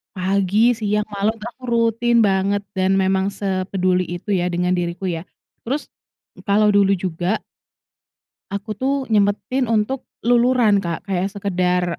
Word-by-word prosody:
pagi, 195 Hz, +4 st, +2 dB
siang, 210 Hz, -2 st, 0 dB
malam 205 Hz, +2 st, 0 dB
itu 215 Hz, -, -13 dB
aku 255 Hz, -, -25 dB
rutin 235 Hz, 0 st, +2 dB
banget, 200 Hz, 0 st, +1 dB
dan 190 Hz, 0 st, +1 dB
memang 190 Hz, 0 st, +2 dB
sepeduli 185 Hz, -2 st, -1 dB
itu 175 Hz, +4 st, -5 dB
ya 180 Hz, -2 st, +1 dB
dengan 180 Hz, 0 st, 0 dB
diriku 175 Hz, 0 st, -2 dB
ya. 175 Hz, -2 st, -3 dB, 0.4 s
Terus 280 Hz, +5 st, -1 dB, 0.6 s
kalau 210 Hz, +1 st, +4 dB
dulu 200 Hz, -1 st, +4 dB
juga 180 Hz, +2 st, -2 dB, 1.1 s
aku 200 Hz, +2 st, -4 dB
tuh 270 Hz, +2 st, +1 dB, 0.2 s
nyempetin 215 Hz, +5 st, +1 dB
untuk 230 Hz, +4 st, -1 dB, 0.2 s
luluran, 240 Hz, -3 st, +4 dB
Kak, 170 Hz, -4 st, -4 dB
kayak 190 Hz, -1 st, -1 dB
sekedar, 185 Hz, -3 st, 0 dB
200 Hz, 135 wpm, -20 LUFS, 185-220 Hz, 1.1 s, kalau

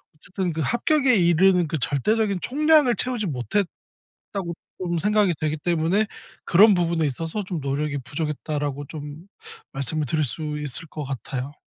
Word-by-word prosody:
어쨌든 180 Hz, +3 st, -3 dB
그 160 Hz, -, -2 dB
합격에 265 Hz, -, +2 dB
이르는 180 Hz, -1 st, +4 dB
그 155 Hz, -, -2 dB
'절대적인 200 Hz, -, +1 dB
총량을 300 Hz, -2 st, +4 dB
채우지 240 Hz, -1 st, -1 dB
못했다.'고 150 Hz, -, -2 dB, 1.0 s
좀 175 Hz, -2 st, -1 dB
생각이 210 Hz, -1 st, +2 dB
되기 155 Hz, 0 st, -1 dB
때문에 170 Hz, +6 st, +1 dB, 0.4 s
그런 200 Hz, +4 st, +6 dB
부분에 170 Hz, -2 st, +1 dB
있어서 165 Hz, -, -3 dB
"좀 180 Hz, -4 st, -4 dB
노력이 140 Hz, +1 st, -2 dB
부족했다."라고 145 Hz, -1 st, -3 dB
좀 150 Hz, +2 st, -8 dB, 0.5 s
말씀을 145 Hz, +3 st, -2 dB
드릴 155 Hz, +3 st, +1 dB
수 150 Hz, +3 st, -4 dB
있을 150 Hz, +2 st, -5 dB
것 150 Hz, -1 st, -6 dB
같아요. 135 Hz, +1 st, -5 dB
165 Hz, 335 characters per minute, -24 LUFS, 150-200 Hz, 1.0 s, 그런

